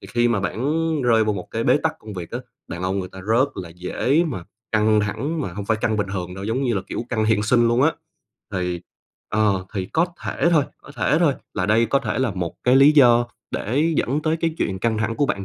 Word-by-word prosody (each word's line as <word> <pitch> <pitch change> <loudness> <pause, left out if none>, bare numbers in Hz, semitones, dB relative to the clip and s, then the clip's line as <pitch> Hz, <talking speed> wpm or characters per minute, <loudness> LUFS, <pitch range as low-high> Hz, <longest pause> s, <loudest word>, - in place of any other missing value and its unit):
thì - - -11
khi 120 0 +2
mà 115 -4 +1
bản 125 +8 -1 0.3
rơi 115 -3 +4
vô 105 - +1
một 95 -3 -6
cái - - -2
bế - - +4
tắc - - -1
công 105 -1 -10
việc 90 -3 -6
á, 120 - -3 0.3
đàn 85 - -6
ông 95 +2 -1
người 90 - -4
ta 95 - -11
rất 115 +7 +1
là 90 -3 -6
dễ 125 - 0
mà 120 - -4 0.3
căng 110 0 +3
thẳng, 120 +11 -2
mà 95 -11 -4
hông 100 +3 -5
phải 110 - +2
căng 110 -2 +1
bình 105 -2 -1
thường 90 -1 -4
đâu, 95 - -6
giống 115 +6 -1
như 120 -4 +1
là, 95 - -1
kiểu, - - -4
căng 110 -2 0
hiện 110 -1 +2
sinh 120 +1 +3
luôn 120 +2 +3
á. 160 +3 +4 0.6
Thì 90 -2 -2 0.5
ờ, 105 -3 +1
thì 95 -2 -1
có 165 - +1 0.2
thể 170 - +1
thôi, 155 -5 +4 0.2
có - - -13
thể 150 - +2
thôi, 155 -6 +3 0.2
là 90 -3 0
đây 115 +2 +3
có 140 - +2
thể 115 -2 -3
là 130 -4 +1
một 90 -3 -4
cái 125 +1 +5
lý 140 +3 +7
do 120 -4 +6 0.2
để 145 +10 0
dẫn 145 +5 0
tới 160 0 +1
cái 165 -1 0
chuyện 95 -1 -1
căng 110 +1 0
thẳng 115 +1 -1
của 145 - +2
bạn 100 -7 -2
110 Hz, 255 wpm, -22 LUFS, 100-130 Hz, 0.6 s, lý